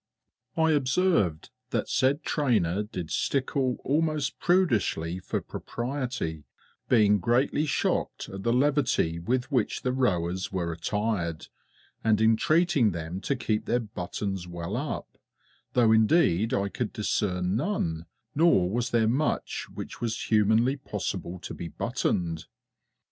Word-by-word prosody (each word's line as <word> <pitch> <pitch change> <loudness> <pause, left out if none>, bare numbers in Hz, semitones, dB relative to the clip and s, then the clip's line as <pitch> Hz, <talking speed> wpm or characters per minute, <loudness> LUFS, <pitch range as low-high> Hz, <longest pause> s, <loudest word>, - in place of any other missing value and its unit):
I 160 0 +4
observed 135 - +1 0.2
that - - -1
said 140 +4 +1
trainer 105 - +1
did 95 -6 -6
stickle 135 -2 0
almost 150 -1 0
prudishly 110 - +1
for - - -3
propriety, 120 - -4 0.4
being 105 -4 +5
greatly 125 - +1
shocked - - -1
at 95 0 -7
the 115 - +1
levity 125 - +2
with 125 - -1
which 125 -6 0
the 125 - +1
rowers 95 -7 0
were 85 -3 -2
attired 90 -2 -2 0.5
and 110 -2 +3
entreating 120 - +3
them 85 +3 -5
to 140 - 0
keep 110 -3 -1
their 120 - +1
buttons 95 -3 -4
well 85 +3 -5
up, 140 +4 -5 0.5
though 120 -3 +4
indeed 110 - +4
I 100 0 +1
could 115 +2 -3
discern 90 -3 0
none, 90 - -1 0.3
nor 140 - +4
was 120 +2 -1
there 115 -3 +2
much 135 +7 -1
which - - -8
was 115 -1 -2
humanly 110 +5 +3
possible 95 -8 -4
to - - -6
be 85 - -6
buttoned. 85 +1 -2
110 Hz, 125 wpm, -27 LUFS, 90-135 Hz, 0.5 s, being